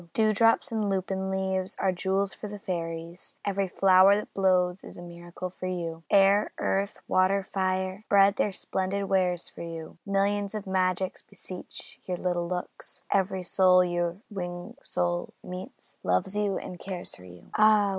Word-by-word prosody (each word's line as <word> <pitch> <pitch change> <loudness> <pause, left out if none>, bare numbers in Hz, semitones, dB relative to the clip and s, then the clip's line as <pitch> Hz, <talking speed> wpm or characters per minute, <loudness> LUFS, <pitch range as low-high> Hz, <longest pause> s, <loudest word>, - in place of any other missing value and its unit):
Dewdrops 220 +1 +3
in 215 -2 0
lupin 190 0 -1
leaves 190 -1 -1
are 190 - +2
jewels 190 +2 0
for 210 - -7
the 205 0 -7
fairies; 170 -2 -5
Every 200 -1 0
flower 190 +1 +6
that 210 - -4
blows 185 -1 +2
is - - -10
a - - -8
miracle 175 +1 -7
for 185 0 -6
you. 170 -3 -3
Air, 200 +1 +5
earth, 195 +1 -1
water, 190 +1 +2
fire, 190 0 0
spread 200 0 +5
their 210 - +2
splendid 190 +1 -2
wares 185 -3 +1
for - - -11
you. 165 -1 -7
Millions 200 +1 0
of 210 -1 -4
magics 185 -1 0
beseech 185 -2 -10
your 180 -1 -2
little 175 -1 -1
looks; 180 0 -6
Every 190 -1 +1
soul 185 0 +5
your 175 0 -1
winged 180 +5 -6
soul 175 -6 -2
meets, 180 +1 -9
loves 90 - +1
you 205 -2 +1
and 180 - -7
cares 185 -2 -6
for 90 - -14
you. 90 -1 -14
Ah! 215 -1 +5
190 Hz, 160 wpm, -28 LUFS, 180-200 Hz, -, flower